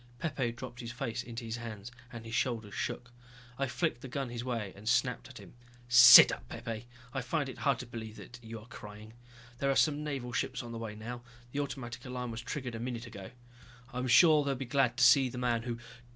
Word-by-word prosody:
Pepe 130 -4 -2
dropped 120 0 -9
his 120 -1 -6
face 120 -2 -3
into 120 0 -7
his 115 +1 -4
hands 115 -1 -7 0.2
and 115 -2 -8
his 115 - -8
shoulders 115 -4 -1
shook. 120 0 -4 0.5
I 135 - +1
flicked 130 -2 -1
the - - -7
gun 130 0 -3
his 120 0 -5
way 115 -6 -3
and 105 +3 -5
snapped - - +1
at - - -12
him. - - -13 0.3
"Sit 120 0 +10
up, 120 - -7
Pepe. 115 0 -6 0.3
I 135 - -1
find 140 +4 -1
it 130 - -8
very - - -8
hard 140 -4 +3
to - - -8
believe 110 -2 -8
that 120 +1 -11
you 115 0 -8
are 105 - -14
crying. 105 -1 -11 0.5
There 140 - +1
are 135 - +2
some 150 0 +2
Naval 135 -5 -4
ships - - -2
on 120 - -8
the 115 - -5
way 110 -2 -6
now, 120 +3 -7 0.3
the 145 - -3
automatic 125 -4 -5
alarm 125 -1 -5
was 115 +1 -5
triggered 125 -1 -5
about 115 - -5
a - - -3
minute 120 -1 -4
ago. 100 -5 -9 0.6
I'm 125 +1 -2
sure 150 +5 +6
they'll 140 -1 -1
be 135 +1 -5
glad 125 -1 +1
to 125 - +3
see 130 +1 +6
the 125 - -8
man 120 -2 0
who...." 120 0 -4
120 Hz, 235 wpm, -31 LUFS, 115-130 Hz, 0.6 s, Sit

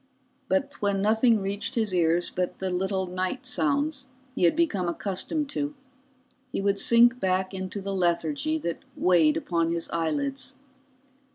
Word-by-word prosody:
But 285 0 0
when 200 -1 +1
nothing 220 +2 +3
reached 200 +1 -3
his 220 -5 0
ears 170 0 +2
but 180 -1 -2
the 190 -1 -3
little 190 +1 -1
night 185 +8 -3
sounds 280 +1 0 0.3
he 180 - +2
had 170 - +4
become 215 - +1
accustomed 200 - -2
to, 290 +1 -3 0.8
he - - -2
would 200 0 +1
sink 240 +3 +5
back 185 -1 0
into 190 +1 -5
the 195 0 -4
lethargy 275 - 0
that 170 - -3 0.2
weighed 170 -4 +4
upon 165 -2 0
his 170 -1 -2
eyelids. 270 - -2
195 Hz, 150 wpm, -26 LUFS, 180-270 Hz, 0.8 s, sink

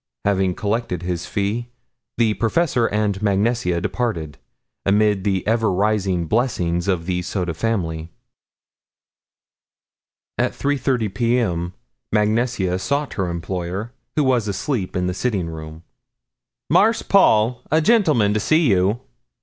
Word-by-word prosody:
Having 95 -2 +1
collected 105 -4 -2
his 90 -2 -3
fee, 105 +4 -2 0.5
the 115 -2 +3
professor 120 +1 +1
and 105 -1 -1
Mag 100 -2 +2
Nesia 100 -5 +1
departed, 85 - -3 0.4
amid 105 -1 +2
the 95 -2 0
ever 110 -1 +2
rising 95 -2 +1
blessings 85 -5 0
of 90 -4 0
the 90 -1 -1
Soda 90 -1 -2
family. 80 -5 -2 2.3
At - - +1
3:30 130 -7 0
P.M. 115 -8 0 0.4
Mag 105 -1 +3
Nesia 110 -6 0
sought 140 +9 -1
her 95 -4 -2
employer, 90 +5 -4 0.2
who 150 - +3
was 125 -5 +2
asleep 100 +1 -2
in 90 0 0
the 90 - -1
sitting 100 -3 -1
room. 80 0 -8 0.8
"Marse 225 +2 +3
Paul, 120 - +4
a 155 - +4
gentleman 155 - +3
to 110 - +1
see 155 +2 +3
you." 95 +5 +2
105 Hz, 125 wpm, -21 LUFS, 90-120 Hz, 2.3 s, Paul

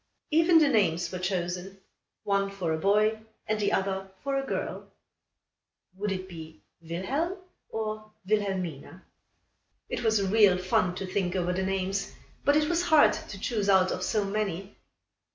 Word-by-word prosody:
Even 330 +2 +5
the 310 -2 +6
names 180 -9 +2
were 185 - -4
chosen 180 +1 -3 0.5
one 200 0 +1
for 185 -5 -2
a - - 0
boy 210 +4 +3 0.3
and 215 0 -1
the 205 - +1
other 195 0 -1
for 275 0 -1
a 270 - 0
girl. - - -4 1.0
Would 205 +1 -2
it 185 -1 -4
be 160 -3 -11 0.2
Wilhelm 255 - -2 0.3
or 215 -1 -4 0.2
Wilhelmina? 190 -5 -2 0.8
It - - -3
was 220 -3 +3
real 200 -1 +5
fun 180 0 +1
to 190 - -4
think 185 -1 -1
over 180 -1 0
the 190 - -1
names, 195 +1 -2 0.3
but 285 - +4
it 300 0 +3
was 340 +1 +1
hard 315 -4 +5
to 195 - -7
choose 210 -1 -1
out 190 -1 +5
of 185 - -3
so 210 +2 0
many. 195 -2 -3
195 Hz, 155 wpm, -28 LUFS, 185-215 Hz, 1.0 s, the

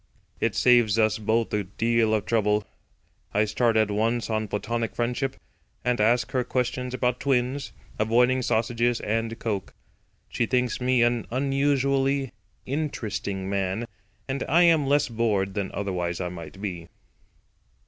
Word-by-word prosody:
It - - 0
saves 120 -4 +4
us 110 0 +2
both 110 +2 0
a 105 -1 +1
deal 110 +3 +1
of 105 - -2
trouble. 105 -2 +1 0.7
I 105 +1 +4
start 110 +2 +1
at 110 -1 +2
once 115 +3 0
on 110 0 -1
platonic 115 +3 -3
friendship, 125 +3 -1 0.5
and 125 -3 +1
ask 120 +3 +2
her 130 -1 +1
questions 125 0 -2
about 125 -1 0
twins, 130 0 0 0.3
avoiding 125 +4 +3
sausages 120 0 +1
and 115 +1 -2
coke. 105 -5 -4 0.5
She 120 - -1
thinks 125 0 0
me 125 -1 +3
an 120 -1 +1
unusually 135 0 +1 0.3
interesting 110 -9 -3
man, 95 +3 -1 0.4
and 135 0 -2
I 170 +5 +5
am 160 -5 +4
less 145 +1 +3
bored 110 -5 0
than 100 -1 -2
otherwise 90 -4 -2
I 90 -1 -2
might 85 +1 -9
be. 90 -5 -5
115 Hz, 140 wpm, -26 LUFS, 105-125 Hz, 0.7 s, I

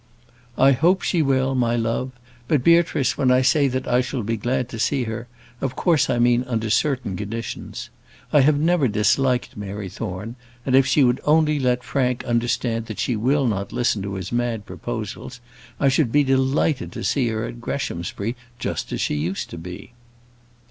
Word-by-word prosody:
"I 135 +1 +6
hope 170 +8 +3
she 170 - +1
will, 135 -2 +1
my 120 -2 +1
love. 115 +2 -1 0.4
But, 145 -3 +2
Beatrice, 165 -5 +3
when 135 -2 +3
I 125 +1 +4
say 140 +2 +4
that 130 0 -3
I 125 +1 +3
shall 125 -1 -3
be 115 +3 -1
glad 125 +3 -1
to 115 - -7
see 135 +3 +1
her, 115 +1 -5 0.3
of 135 -1 -2
course 165 -8 +2
I 125 - +1
mean 120 +1 +3
under 115 -3 -2
certain 130 -4 0
conditions. 105 +3 -6 0.4
I 150 - +7
never 155 0 +2
disliked 120 +4 +1
Mary 100 -1 -6
Thorne, 105 +4 -6 0.3
and 130 - +2
if 135 0 +5
she 135 +2 +4
would 125 0 +2
only 150 -1 +3
let 125 -1 +1
Frank 125 -3 -1
understand 120 -1 0
that 110 - -6
she 125 - 0
will 135 +6 +1
not 100 -4 -1
listen 120 -4 0
to 100 0 -4
his 95 -1 -5
mad 120 -3 -1
proposals, 125 - -6 0.4
I 140 - +3
should 135 -2 +2
be 145 +3 +4
delighted 135 +2 +1
to - - -6
see 130 -4 +1
her 110 0 -2
at 120 - -8
Greshamsbury 105 -2 -3 0.2
just - - -4
as - - -2
she - - 0
used 80 +6 -3
to 85 - -7
be." 90 +7 -9
125 Hz, 185 wpm, -22 LUFS, 110-135 Hz, 0.4 s, I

